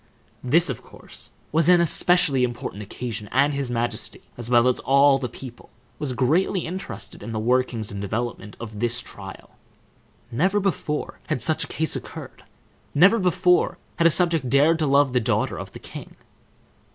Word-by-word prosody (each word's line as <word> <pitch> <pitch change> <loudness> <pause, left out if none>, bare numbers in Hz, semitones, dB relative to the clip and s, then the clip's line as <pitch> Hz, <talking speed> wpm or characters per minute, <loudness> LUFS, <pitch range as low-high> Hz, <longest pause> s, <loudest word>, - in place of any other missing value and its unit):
This, 160 +8 +3
of 130 -5 -4
course, - - -12 0.2
was 160 +2 +3
an 180 -1 +7
especially 170 -4 +3
important 120 -4 -4
occasion, 110 0 -6
and 140 +3 +3
his 140 -2 -2
majesty, 120 0 -3
as 120 -1 -7
well 120 0 +4
as 125 - +1
all 140 0 +4
the 125 -2 -4
people, 120 0 -11 0.3
was 140 -4 -2
greatly 160 +9 +1
interested 185 +3 -7
in 115 - -6
the 110 - -2
workings 120 -1 0
and 100 0 -5
development 110 +1 -4
of 110 -3 -8
this 120 +2 0
trial. 95 -2 -11 0.8
Never 185 - +1
before 180 -6 -2
had - - -1
such 155 +3 +1
a - - -6
case 160 0 0
occurred; - - -8 0.5
never 195 +10 +6
before 180 -1 +2 0.2
had 170 - +5
a - - +6
subject 165 -6 +1
dared 150 +5 +4
to 155 - +1
love 140 -1 +3
the 125 - +3
daughter 110 - -1
of - - -8
the - - -10
king. - - -10
135 Hz, 170 wpm, -23 LUFS, 120-165 Hz, 0.8 s, an